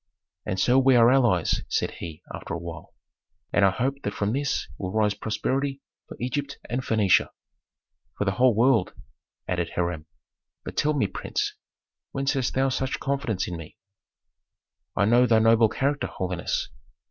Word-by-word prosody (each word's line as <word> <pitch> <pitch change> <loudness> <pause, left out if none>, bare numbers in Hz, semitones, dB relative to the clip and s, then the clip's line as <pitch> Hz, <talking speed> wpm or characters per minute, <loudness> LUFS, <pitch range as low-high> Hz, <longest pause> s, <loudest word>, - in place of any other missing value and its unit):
"And 95 - -1
so 125 +6 +4
we 135 -1 +5
are 120 0 +6
allies," 120 -11 +3
said - - 0
he, 80 -3 -8
after - - -5
a - - -2
while, 85 -1 -9 0.6
"and 100 - +4
I 100 - +7
hope 135 +8 -2
that 100 - -4
from 105 +1 -1
this 140 0 -1
will 95 -1 -3
rise 105 -1 +2
prosperity 135 +7 -2 0.3
for - - -10
Egypt 140 +3 -3
and 125 +2 -2
Phœnicia." 110 -6 +3 0.9
"For 100 - -1
the 95 - +2
whole 125 +3 +3
world," 115 -3 +3 0.5
added 85 -2 -2
Hiram. 85 -3 -2 0.6
"But - - -7
tell 150 +1 +1
me, 135 - +2
prince, 95 - -3 0.6
whence 135 +1 0
hast 130 -3 -1
thou 135 +1 +2
such 130 0 -2
confidence 140 -8 -1
in 85 - -4
me?" 80 -2 -11 1.2
"I 100 - +3
know 120 +3 +5
thy 115 - +4
noble 115 0 +5
character, 140 +5 -1
holiness. 90 -2 -3
115 Hz, 160 wpm, -25 LUFS, 95-135 Hz, 1.2 s, I